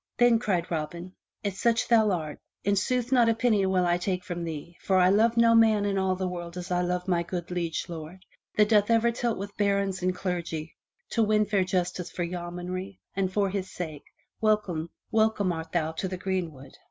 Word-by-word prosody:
Then 240 -2 +5
cried 185 -7 -1
Robin, 170 +3 -4
" - - -54
If 200 -2 -1
such 230 +2 +2
thou 225 -3 +5
art, 160 -6 -3 0.2
in 200 0 +2
sooth 245 +5 0
not 240 -3 +5
a 225 - +2
penny 225 -4 +2
will 185 -1 +2
I 175 0 +2
take 180 0 -2
from 175 -1 -4
thee, 165 +1 -6
for 190 - +2
I 180 0 +5
love 225 +4 +3
no 230 0 +6
man 220 -2 +5
in 195 -1 0
all 190 -1 +1
the 185 0 -2
world 175 -1 -6
as 180 +1 -6
I 180 0 +2
love 180 +1 -1
my 175 -2 +2
good 175 0 -5
liege 170 -2 -2
lord, 170 +2 -8 0.3
that 210 -1 +5
doth 210 -1 +4
ever 230 +1 +4
tilt 235 -1 -1
with 200 +1 -6
barons 200 -2 +1
and 180 0 0
clergy 170 -4 -4 0.4
to 230 - +1
win 215 -1 +3
fair 200 -2 +2
justice 180 -1 -2
for 180 - -3
yeomanry, 180 +2 -5 0.2
and 190 -1 0
for 200 0 +1
his 190 -1 -3
sake, 155 -5 -6 0.3
welcome 200 -7 +1 0.2
art 200 -7 +1
thou 160 -2 0
to 160 +4 -3
the 185 0 -4
greenwood." 175 -8 -4
185 Hz, 205 wpm, -27 LUFS, 175-210 Hz, 0.4 s, no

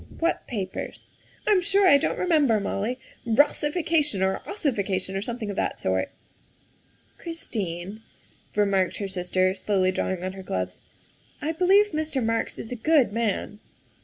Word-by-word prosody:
What 335 +1 0
papers?" 195 -6 -5 0.4
"I'm 410 -3 +4
sure 390 +2 +3
I 285 -5 +7
don't - - -1
remember, 295 -11 +3
Molly. 210 +5 -2 0.2
Rossification 295 - +2
or 190 0 0
ossification 200 - -1
or 195 - -1
something 225 -1 -4
of - - -6
that - - -1
sort." 95 0 0 0.6
" - - -35
Christine," 205 - -5 0.5
remarked 200 -3 +2
her 200 - -3
sister, 185 0 +1
slowly 190 -1 +1
drawing 185 -1 -2
on 185 0 -3
her 190 - -8
gloves, 90 - -3 0.2
' - - -33
' - - -33
I 305 - -1
believe 385 +5 +4
Mr. 305 -5 -1
Marks 225 0 -1
is 225 - -6
a - - -2
good 270 -2 +3
man. 210 -2 -1
220 Hz, 155 wpm, -26 LUFS, 190-300 Hz, 0.6 s, I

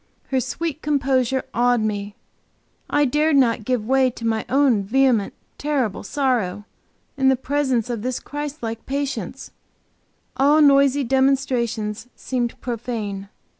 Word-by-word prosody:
Her 265 - +1
sweet 305 +4 -3
composure 265 -3 +1
awed 245 -1 +2
me; 205 -1 -3 0.7
I 290 0 +3
dared 300 +3 +2
not 235 -5 +3
give 250 -3 0
way 265 +1 +3
to 230 -1 -8
my 225 -1 0
own 265 -5 +3
vehement, 235 0 +2 0.2
terrible 275 -8 -1
sorrow; 215 -6 -1 0.5
in 265 -1 +4
the 265 - +4
presence 265 -3 0
of 235 -3 -3
this 250 +2 -2
Christ 290 -1 -6
like 225 0 -5
patience, 270 -4 -4 0.8
all 285 +4 +4
noisy 280 -1 +5
demonstrations 250 -4 0
seemed 245 -2 -3
profane. 215 -5 -4
255 Hz, 130 wpm, -22 LUFS, 225-275 Hz, 0.8 s, noisy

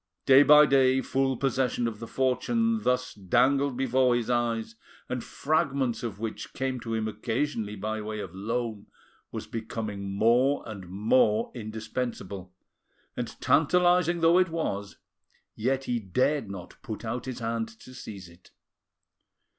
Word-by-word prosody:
Day 135 +1 +8
by 150 +1 +8
day 130 -2 +4
full 135 -1 0
possession 130 -3 0
of 110 -2 -5
the 115 - -7
fortune 225 - +1
thus 125 -6 0
dangled 130 +7 +2
before 130 -1 +3
his 120 0 -1
eyes, 115 -2 0 0.3
and 125 -2 -3
fragments 140 -5 0
of 110 -4 -5
which 110 -1 -5
came 130 -1 -2
to 115 -1 -4
him 110 -1 -1
occasionally 110 0 -2
by 110 +2 -3
way 110 0 -5
of 95 -4 -6
loan, 110 +1 -3 0.4
was - - -5
becoming 110 -3 -5
more 120 +7 +3
and 100 -5 -8
more 110 +3 +2
indispensable, 110 -4 -5 0.6
and - - -5
tantalising 175 +1 +3
though 165 +2 +5
it 185 -1 +3
was, 100 -12 -3 0.6
yet 130 +4 -1
he 120 -2 -1
dared 120 +5 0
not 95 -2 -9
put 115 -3 -6
out 120 +2 -3
his 130 -2 -5
hand 115 -1 -2
to 115 +3 -14
seize 100 -7 -9
it. 85 +1 -19
120 Hz, 145 wpm, -27 LUFS, 110-135 Hz, 0.6 s, Day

